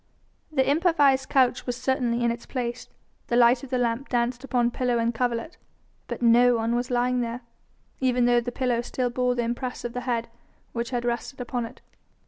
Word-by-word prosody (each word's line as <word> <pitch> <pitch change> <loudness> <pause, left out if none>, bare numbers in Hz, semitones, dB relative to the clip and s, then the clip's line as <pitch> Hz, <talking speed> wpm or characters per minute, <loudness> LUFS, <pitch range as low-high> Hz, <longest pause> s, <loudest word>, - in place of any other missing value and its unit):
The 265 -4 +1
improvised 285 -4 +3
couch 260 -2 +2
was 245 -1 -2
certainly 255 -2 0
in 235 - +3
its 235 0 -7
place, 245 -2 -4 0.4
the 235 - 0
light 240 +1 +5
of 275 - -8
the 255 - 0
lamp 245 +2 -1
danced 245 +1 0
upon 245 -3 +1
pillow 245 -1 0
and 230 0 +1
coverlet, 240 +5 -2 0.5
but - - -5
no 240 +1 +6
one 230 0 0
was 245 +1 -1
lying 250 0 +1
there, 235 +1 -4 0.6
even 250 -2 +2
though 240 0 +4
the 245 +1 -4
pillow 245 -2 0
still 245 0 -2
bore 250 0 +1
the 240 - 0
impress 245 +2 -4
of 240 - -4
the 250 - -3
head 235 -2 -1 0.5
which 235 0 -3
had 245 -2 -2
rested 240 +1 -3
on 240 -2 0
it. - - -16
245 Hz, 195 wpm, -25 LUFS, 235-255 Hz, 0.6 s, no